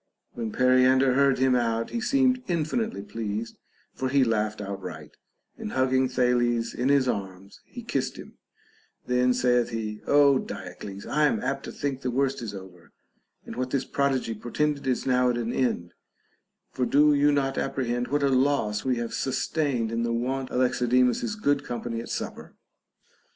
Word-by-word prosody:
When 115 -2 -4
Periander 130 +1 +4
heard 140 0 +3
him 130 0 +3
out, 115 -1 0
he 235 - -2
seemed 255 0 +2
infinitely 170 - -1
pleased, 110 +1 -5 0.3
for 130 - -2
he 140 0 +4
laughed 110 -3 0
outright, 100 -1 -7 0.4
and 105 - -5
hugging 130 0 +2
Thales 120 -2 +1
in 125 +3 -1
his 140 -2 +3
arms 95 -3 -5
he 240 - -10
kissed 240 - -2
him; - - -12 0.7
then 125 0 +2
saith 125 -1 +2
he, 110 -2 -4
Ο 140 -2 +5
Diocles, 95 +2 -8
I 150 0 +2
am - - 0
apt 135 0 -2
to - - -6
think 140 -2 -3
the 125 - -2
worst 135 +1 0
is 105 -3 -5
over, 95 -3 -12 0.5
and - - -8
what 130 0 -2
this 135 0 -1
prodigy 135 -4 0
portended 140 +5 -2
is 130 -2 0
now 125 -1 +3
at 120 - 0
an 120 0 -2
end; 90 -9 -1 0.8
for 125 - -1
do 150 +1 +5
you 145 +1 +4
not 135 -2 0
apprehend 125 -2 -2
what 145 +3 0
a 140 - +3
loss 130 -6 +1
we 130 -1 +1
have 120 -1 -4
sustained 130 -3 -1
in 115 0 -1
the 120 0 -1
want 130 +3 -2
of 125 - 0
Alexidemus's 125 - +2
good 145 -9 +1
company 120 -3 -4
at - - -9
supper - - -6
125 Hz, 170 wpm, -26 LUFS, 115-140 Hz, 0.8 s, Ο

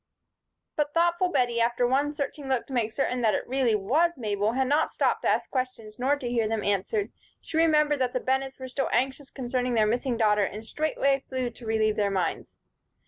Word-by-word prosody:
But 295 0 -1
thoughtful 345 +2 +2
Bettie, 245 -6 +1
after 240 +1 +2
one 280 +4 +1
searching 280 -1 -4
look 260 -3 0
to 270 - -10
make 230 -3 0
certain 250 0 -1
that 220 -2 +3
it - - -3
really 255 -3 +2
was 295 - +1
Mabel, 210 -2 -1
had 265 +1 +1
not 295 +4 +2
stopped - - +1
to - - +1
ask - - 0
questions, 255 -5 -4
nor 270 +3 +2
to 275 -4 -6
hear 235 -2 +1
them 220 -1 -2
answered. 205 - 0 0.3
She - - -9
remembered 300 -3 +3
that 255 -1 0
the 255 - 0
Bennetts 265 +1 -1
were 260 - -6
still 265 +2 -2
anxious 265 +3 0
concerning 250 -2 -2
their 215 -1 +4
missing 240 +3 0
daughter, 210 -2 +3
and 210 +3 -4
straightway 275 0 0
flew 255 -2 -2
to 235 +1 -13
relieve 220 -1 +1
their 205 -1 +2
minds. 190 -2 -2
255 Hz, 205 wpm, -27 LUFS, 225-280 Hz, 0.3 s, their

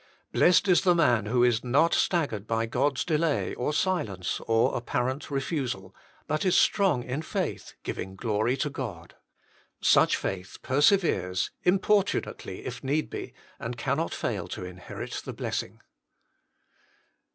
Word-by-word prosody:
Blessed 180 +1 +4
the 180 -2 +4
man 120 -11 +3
who 120 +2 +3
is 120 -2 +3
not 140 +7 +3
staggered 140 - 0
by 115 0 0
God 130 +4 0
s - - 0
delay, 155 -2 0
or 125 - -1
silence, 145 - -1
or 115 0 +3
apparent 125 +3 -2
refusal, 130 - -3 0.3
but 155 - -1
is 185 -2 +3
strong 185 - +3
in 125 +5 -3
faith, 160 - -4
giving 95 0 -5
glory 110 +4 0
to 145 - -1
God. 100 -12 -6 0.7
Such - - +4
faith 95 0 -5
perseveres, 130 - +2 0.2
importu 195 +2 +3
nately, 95 - -8
if 125 +1 -6
need 145 +3 -1
be, - - -6 0.2
and 120 +1 -5
cannot 140 +6 -1
fail - - -3
to - - -6
inherit 90 0 -7
the - - -6
blessing. - - -4
130 Hz, 140 wpm, -27 LUFS, 110-155 Hz, 0.7 s, Blessed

